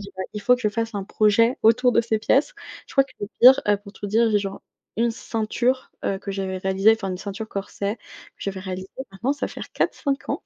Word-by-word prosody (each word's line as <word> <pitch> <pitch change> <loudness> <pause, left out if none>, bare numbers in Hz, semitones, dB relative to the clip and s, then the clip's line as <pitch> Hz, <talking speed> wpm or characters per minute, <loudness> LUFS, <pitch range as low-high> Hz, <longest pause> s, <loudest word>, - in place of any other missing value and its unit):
dis: 200 -1 -9
«Bah, 190 - -3
il 210 - -5
faut 250 +5 +5
que 250 - -7
je 210 - +1
fasse 225 +1 -3
un 200 -1 -3
projet 220 +4 +3
autour 230 +3 +5
de 235 - +3
ces 225 -1 0
pièces». 280 - +2 0.3
Je - - -14
crois 275 -1 +4
que - - -20
le 205 - -4
pire, 260 +2 +9
heu, 205 0 +4
pour 200 -1 -13
tout 205 - -6
dire, 225 +2 +3
j'ai 210 - +3
genre 195 -1 -5 0.4
une 235 +1 +2
ceinture, 235 +3 -1
heu, 195 - 0
que 200 - -6
j'avais 190 -1 -3
réalisée, 190 +3 +4
enfin 215 -4 -3
une 180 - -3
ceinture 205 +2 -6
corset 200 +2 -4
que - - -38 0.4
j'avais 195 -1 -4
réalisée, 185 0 -5 0.2
maintenant 235 +8 -1
ça 290 - -3
va - - -9
faire - - -9
4-5 275 -2 -1
ans - - -2
210 Hz, 245 wpm, -23 LUFS, 195-235 Hz, 0.4 s, pire